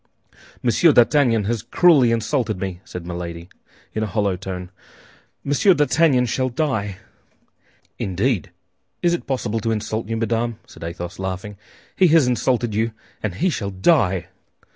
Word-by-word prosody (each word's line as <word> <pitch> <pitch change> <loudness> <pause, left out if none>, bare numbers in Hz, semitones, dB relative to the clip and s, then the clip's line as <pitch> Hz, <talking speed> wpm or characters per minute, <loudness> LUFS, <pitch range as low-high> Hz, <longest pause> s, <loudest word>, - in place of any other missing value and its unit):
"Monsieur 125 +8 +4
d'Artagnan 120 -3 +4
has 110 +1 -1
cruelly 150 -9 +4
insulted 115 -3 -1
me," 95 -1 -4
said 90 -1 -8
Milady, 85 0 -6 0.4
in 110 - -2
a 110 - 0
hollow 100 -3 0
tone; 90 -1 -6 0.7
"Monsieur 145 +7 +3
d'Artagnan 145 -3 +3
shall 130 +2 -1
die!" 110 -8 -2 1.0
"Indeed! 95 - -1 0.5
Is 175 -1 +3
it 175 - -3
possible 120 -5 -1
to 115 - -2
insult 110 0 -2
you, 115 - -1
madame?" 115 0 -1
said - - -13
Athos, 85 +1 -6
laughing; 95 +2 -4 0.4
"he 185 - +5
has 160 -3 +5
insulted 125 -2 0
you, 110 +2 0 0.3
and 100 -4 -3
he 180 +3 +1
shall 100 -9 -3
die!" 95 - +2
115 Hz, 140 wpm, -21 LUFS, 95-130 Hz, 1.0 s, he